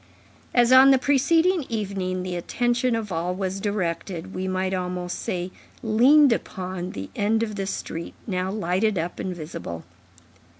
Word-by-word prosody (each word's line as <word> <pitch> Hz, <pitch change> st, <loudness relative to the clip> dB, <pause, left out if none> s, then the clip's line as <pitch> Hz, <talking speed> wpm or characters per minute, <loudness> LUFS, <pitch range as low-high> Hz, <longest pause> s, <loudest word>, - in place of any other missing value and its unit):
As 240 Hz, 0 st, +5 dB
on 260 Hz, +1 st, +9 dB
the 270 Hz, -, +6 dB
preceding 320 Hz, +6 st, +3 dB
evening, 190 Hz, -4 st, -2 dB
the 180 Hz, -1 st, -4 dB
attention 240 Hz, +7 st, 0 dB
of 220 Hz, -3 st, -4 dB
all 175 Hz, +2 st, -1 dB
was 190 Hz, 0 st, -3 dB
directed, 190 Hz, -2 st, -3 dB
we 185 Hz, 0 st, -3 dB
might 185 Hz, 0 st, -1 dB
almost 180 Hz, -1 st, -3 dB
say 180 Hz, 0 st, -3 dB, 0.3 s
leaned 255 Hz, +5 st, +6 dB
upon, 185 Hz, -4 st, -5 dB
the 95 Hz, 0 st, -7 dB
end 220 Hz, +2 st, +1 dB
of 215 Hz, -2 st, -4 dB
the 195 Hz, -1 st, -3 dB
street, 170 Hz, -3 st, -5 dB
now 185 Hz, -2 st, -2 dB
lighted 200 Hz, +1 st, 0 dB
up 170 Hz, +1 st, -3 dB
and 185 Hz, -1 st, -3 dB
visible. 150 Hz, -, -7 dB
190 Hz, 155 wpm, -24 LUFS, 180-230 Hz, 0.3 s, on